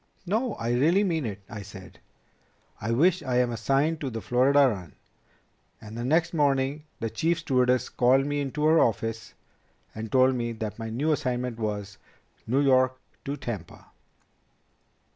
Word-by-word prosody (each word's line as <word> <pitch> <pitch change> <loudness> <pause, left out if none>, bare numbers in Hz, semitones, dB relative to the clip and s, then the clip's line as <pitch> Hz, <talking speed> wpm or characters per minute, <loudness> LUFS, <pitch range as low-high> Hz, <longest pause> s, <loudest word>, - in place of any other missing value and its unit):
"No. 220 +5 -1
I 115 +1 -3
really 165 +11 +3
mean 165 - -1
it. 100 -2 -7
I 105 -3 -7
said, 95 -2 -12 0.8
'I 110 - -2
wish 175 +8 +3
I 130 -4 -1
am 125 -1 +2
assigned 135 +7 0
to 140 - -2
the 115 -2 -5
Florida 130 +5 +3
run.' 95 -9 -5 0.8
And 110 +1 -10
the 120 - -4
next 165 +6 +1
morning 140 -1 +1
the 115 -2 -3
Chief 170 +1 0
Stewardess 130 -5 +1
called 130 +2 +3
me 145 0 -1
into 145 +2 -2
her 160 +1 +5
office 115 0 -1 0.6
and 110 0 -6
told 130 0 +4
me 120 -2 -2
that 110 0 -6
my 115 0 -4
new 140 +8 0
assignment 125 -5 -2
was 105 -2 -4 0.5
New 130 +5 +2
York 130 -2 +3 0.3
to 140 +1 -3
Tampa." 105 - -7
130 Hz, 160 wpm, -26 LUFS, 115-145 Hz, 0.8 s, her